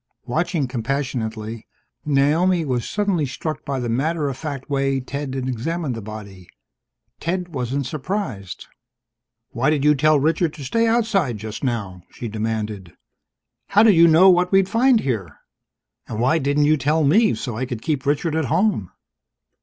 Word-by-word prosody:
Watching 155 +3 -1
compassionately, 115 -3 -3 0.4
Naomi 155 +5 +2
was 125 -4 -2
suddenly 195 -8 0
struck 155 +3 -5
by 140 -2 -3
the 120 - -3
matter 145 +6 0
of 135 - -4
fact 140 -2 -6
way 135 -1 0
Ted 135 +1 -5
examined 130 +4 -2
the 115 - -6
body. 100 -4 -9 0.7
Ted 180 +1 -2
wasn't 135 -2 -2
surprised. 135 - -4 0.9
"Why 125 +4 +1
did 150 -3 +1
you 150 - +6
tell 155 +1 +3
Richard 160 +2 +1
to 145 - -8
stay 230 - +1
outside, 215 - +1
just 110 +3 -7
now?" 100 -8 -3
she 120 - -7
demanded. 105 -4 -4 0.7
"How 205 +2 +4
did 220 -2 +6
you 170 -1 +6
know 165 +4 +6
what 180 0 +2
we'd 195 -1 +4
find 235 +2 +3
here? 105 - -3 0.7
And 110 - -5
why 135 +7 +3
didn't 145 +1 +1
you 155 +1 +4
tell 150 +3 +1
me, 210 +10 +4
so 120 -4 -5
I 125 +3 -3
could 120 -4 -6
keep 145 -5 -1
Richard 150 +2 0
at 160 -2 0
home?" 135 - +1
140 Hz, 160 wpm, -21 LUFS, 120-165 Hz, 0.9 s, you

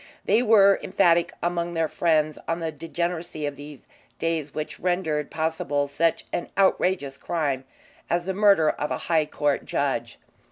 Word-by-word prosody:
They 215 +4 +3
were 205 -4 +5
emphatic 170 -2 +3
among 175 0 -1
their 165 -1 +1
friends 155 -2 +1
on 165 - 0
the 165 -2 -3
degeneracy 165 +1 -4
of 145 -1 -3
these 145 -1 -11 0.3
days 160 -3 -2
which 155 +1 -5
rendered 165 -5 -1
possible 155 -3 -1
such 160 +4 0
an 175 - -3
outrageous 180 -7 +1
crime 140 -6 -2 0.4
as 175 0 0
the 190 - -1
murder 195 -6 +4
of 150 - -4
a - - -1
High 160 -3 +1
Court 145 -1 0
judge. - - -2
165 Hz, 155 wpm, -25 LUFS, 150-175 Hz, 0.4 s, were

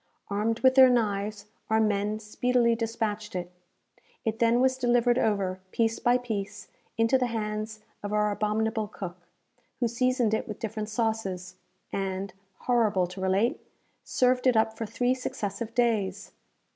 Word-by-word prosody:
Armed 220 +3 0
with 260 0 +6
their 260 -1 +8
knives, 210 -3 0 0.2
our 220 0 +3
men 210 -1 +1
speedily 235 +2 +1
despatched 225 -2 -3
it. 180 -1 -4 0.7
It 225 0 -1
then 235 0 +4
was 260 0 +2
delivered 245 0 +3
over, 195 -4 0
piece 225 -1 +1
by 245 +1 +3
piece, 220 -5 -5 0.3
into 230 +3 +3
the 250 - +1
hands 215 -1 -4 0.2
of 205 - -5
our 210 0 +2
abominable 215 +1 0
cook, 180 -4 -8 0.5
who 240 - +2
seasoned 245 -1 +1
it 220 - -1
with 215 - -6
different 220 -1 -4
sauces, 215 -5 -2 0.4
and, 195 0 -3 0.3
horrible 220 -7 +2
to 180 +2 -8
relate, 190 +5 +1 0.4
served 255 0 +2
it 250 -3 +4
up 220 0 +2
for 225 - -4
three 245 +3 +1
successive 225 -3 -4
days! 205 -5 0
220 Hz, 145 wpm, -28 LUFS, 205-240 Hz, 0.7 s, their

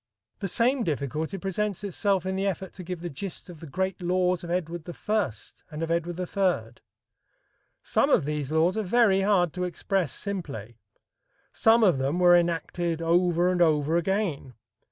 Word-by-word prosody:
The 195 - -2
same 245 +6 +2
difficulty 155 - -2
presents 195 +1 -2
itself 195 -1 0
in 190 0 -1
the 195 +1 0
effort 190 -1 -3
to 185 - -9
give 180 -1 -6
the 175 - -4
gist 180 +4 -5
of 165 - -13
the 165 - -9
great 190 +5 -2
laws 180 0 +1
of 170 - -7
Edward 175 -1 -3
I 210 - -1 0.4
and 155 +1 -5
of 165 - -2
Edward 170 +1 -1
III. 180 - -1 1.0
Some - - +2
of - - +3
these 150 -1 -3
laws 160 +3 +2
are 220 - 0
very 205 -1 +3
hard 190 -5 +2
to 180 - -3
express 180 -2 -1
simply; 135 - -5 0.7
some 225 +1 +4
of 180 -10 +4
them 135 +5 0
were 175 -1 +6
enacted 170 -1 0
over 175 +1 +2
and 180 -1 0
over 155 -1 +3
again. 170 - -1
175 Hz, 170 wpm, -27 LUFS, 160-190 Hz, 1.0 s, were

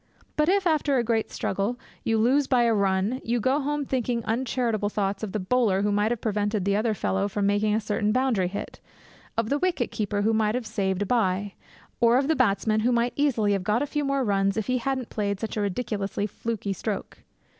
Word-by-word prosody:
But, 300 +2 +2
if, 390 0 +2
after 300 -4 +2
a 240 - +2
great 225 -1 0
struggle, 200 +6 -2 0.3
you 225 0 +1
lose 260 +5 +3
by 250 -2 +3
a 230 -1 +3
run, 200 +4 +1
you 235 +1 0
go 260 +6 +2
home 295 0 -1
thinking 245 -3 -1
uncharitable 230 -3 0
thoughts 200 -1 -2
of 215 -3 -4
the 215 - -1
bowler 200 -1 +1
who 205 - +1
might 205 +1 +2
have 240 - -2
prevented 205 -2 -1
the 200 0 +2
other 215 +1 +1
fellow 195 0 0
from 205 0 -1
making 205 +1 +2
a - - +2
certain 210 -1 0
boundary 245 -6 +1
hit, 200 +3 -6 0.6
of 225 -1 0
the 285 - +1
wicket 350 -9 0
keeper 205 -1 -1
who 225 +2 +2
might 215 0 +1
have 250 -2 -2
saved 190 -2 -1
a - - -3
bye, 200 -3 0 0.5
or 235 +1 +5
of 270 +1 +1
the 320 - +3
batsman 215 -3 +2
who 235 +3 +2
might 240 0 +1
easily 235 -8 +2
have 195 -2 -1
got 215 +6 +1
a - - 0
few 295 0 -2
more 275 -1 0
runs 195 -2 +1
if 220 - -1
he 255 0 0
hadn't 260 -1 -2
played 200 -2 -2
such 225 - -4
a 215 - -1
ridiculously 200 -1 -2
fluky 210 -1 -3
stroke. 205 0 -5
220 Hz, 220 wpm, -26 LUFS, 205-250 Hz, 0.6 s, or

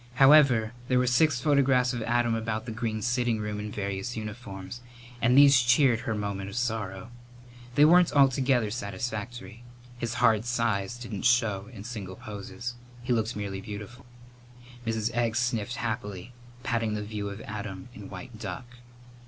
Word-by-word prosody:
However, 135 -5 +6
there 125 - +2
were 125 - +3
six 125 +2 +3
photographs 135 -3 +3
of 120 - -3
Adam 120 +1 +1
about 110 -1 -2
the 120 - -5
green 110 -1 -3
sitting 120 -1 +1
room 105 -1 -4
in 105 0 -5
various 100 +4 -4
uniforms, 105 -1 -7 0.4
and 125 +3 +4
these 140 -2 +8
cheered 120 0 +4
her 115 -1 -3
moment 100 -2 -3
of 100 - -9
sorrow. 115 -3 -3 0.6
They 145 - +7
weren't 175 +2 +6
altogether 130 -5 +3
satisfactory. 115 +1 -5 0.4
His 120 0 -3
hard 110 0 +3
size 115 -3 -1
didn't 120 -5 -6
show 115 -5 +2
in 105 -5 -9
single 105 -6 -6
poses. 115 +2 -7 0.3
He 125 - +1
looked 115 0 0
merely 100 -2 -4
beautiful. 105 +5 -9 0.8
Mrs. 110 0 0
Egg 115 -1 0
sniffled 120 -1 -1
happily, 105 -1 -4 0.3
patting 115 -4 0
the 105 - -3
view 105 -1 -4
of 100 +1 -7
Adam 105 -1 -7
in 105 -4 -10
white 110 +4 -9
duck. 120 +4 -7
115 Hz, 155 wpm, -28 LUFS, 105-125 Hz, 0.8 s, these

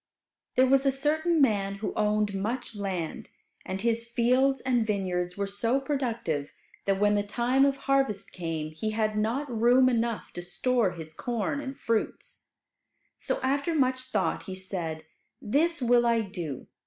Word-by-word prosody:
There 255 - +6
was 270 +1 +4
a - - +5
certain 305 +5 +1
rich 320 - +3
man 200 -5 +1
who 205 +2 -4
owned 210 -1 +1
much 230 +6 -3
land. 190 -5 -4 0.3
And 190 +2 -4
his 230 0 +1
fields 250 +3 +2
and 250 -3 +2
vineyards 185 -4 -1
were 200 - 0
so 230 +6 0
productive 235 - -2 0.3
that 195 -1 +1
when 205 0 +4
the 205 - +2
time 240 +6 +2
of 275 -1 +1
harvest 270 -9 0
came, 160 -3 -4
he 215 +8 -3
had 215 -1 +1
not 230 +7 0
room 245 +3 +5
enough 235 -2 -1
to 175 - -5
store 220 +3 +1
his 160 -2 -8
corn 240 - -2
and 270 -1 -6
fruits. 230 -1 -2 0.7
So - - -1
after 280 +5 +1
much 260 -3 +2
thought 190 -10 -1
he 190 - -5
said, 175 -4 -4 0.3
"This 295 +6 +1
will 240 0 +4
I 230 -1 +3
do. 170 - -5
225 Hz, 165 wpm, -28 LUFS, 195-260 Hz, 0.7 s, There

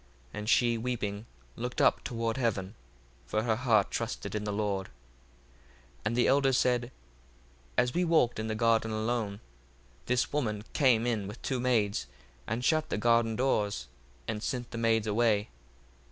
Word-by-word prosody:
1:35 - - -5
And 105 +1 -4
she 120 -1 +4
weeping 110 -3 -3 0.3
looked 125 +1 -4
up - - +3
toward 115 -1 -2
heaven: 105 -6 -1 0.5
for 110 - 0
her 110 -2 +1
heart 110 -4 +2
trusted - - -3
in 105 0 -2
the 105 - -1
Lord. 100 -2 -1
1:36 - - -23 1.1
And 115 - 0
the 120 - +3
elders 135 -1 +3
said, 125 0 +1 0.9
As 125 0 +2
we 180 - +1
walked 160 -10 +2
in 110 - -2
the 110 - -2
garden 115 0 +2
alone, 110 -2 -2 0.7
this 125 +2 +1
woman 105 -8 -1
came 125 -6 +4
in 110 -5 -1
with 105 +5 -8
two 130 - -1
maids, 110 - +1 0.4
and 115 +3 -2
shut 155 0 +2
the - - -1
garden 115 0 +3
doors, 105 - 0 0.4
and 110 -1 -3
sent 125 +1 -3
the 115 - -4
maids 115 -1 +2
away. 105 -1 +2
115 Hz, 165 wpm, -30 LUFS, 105-125 Hz, 1.1 s, she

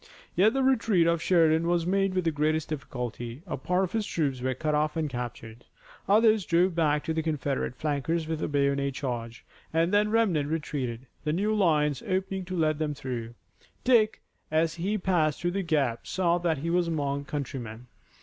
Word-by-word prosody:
Yet 205 +6 +4
the 270 - +2
retreat 225 -9 +3
of 170 -1 +2
Sheridan 165 -2 +3
was 170 -1 +1
made 195 +1 +1
with 185 - +1
the 165 - +1
greatest 155 +1 0
difficulty. 125 -3 -5
A 180 - -3
part 180 +7 0
of 185 - -2
his 225 -1 0
troops 140 -6 -1
were 130 0 -1
cut 150 +3 -1
off 150 +1 +1
and 160 -1 0
captured. 120 -3 -6 0.5
Others 215 -1 +4
drove 180 +2 +3
back 150 -3 +1
the 160 0 0
Confederate 145 -5 -2
flankers 155 +3 -1
with 160 -1 -3
a - - 0
bayonet 140 -1 0
charge, 120 -4 -5 0.3
and 165 +4 +1
then 205 +1 +4
the 210 - -4
remnant 180 -11 +2
retreated, 135 -6 -3 0.2
the 150 0 0
new 205 +5 +1
lines 150 -8 +2
opening 190 0 -1
to 185 0 -4
let 155 -2 +1
them 150 -2 -1
through. 120 -4 -5 0.5
Dick, 225 -4 +3 0.3
as 160 +1 +1
he 195 +5 -1
passed 175 -6 +1
through 175 - -1
the 195 +2 -1
gap, 145 -9 0
saw 175 -2 +1
that 170 -3 0
he 165 +5 -2
was 175 0 +2
among 140 -3 -2
countrymen. 125 -5 -5
160 Hz, 190 wpm, -28 LUFS, 140-180 Hz, 0.5 s, Yet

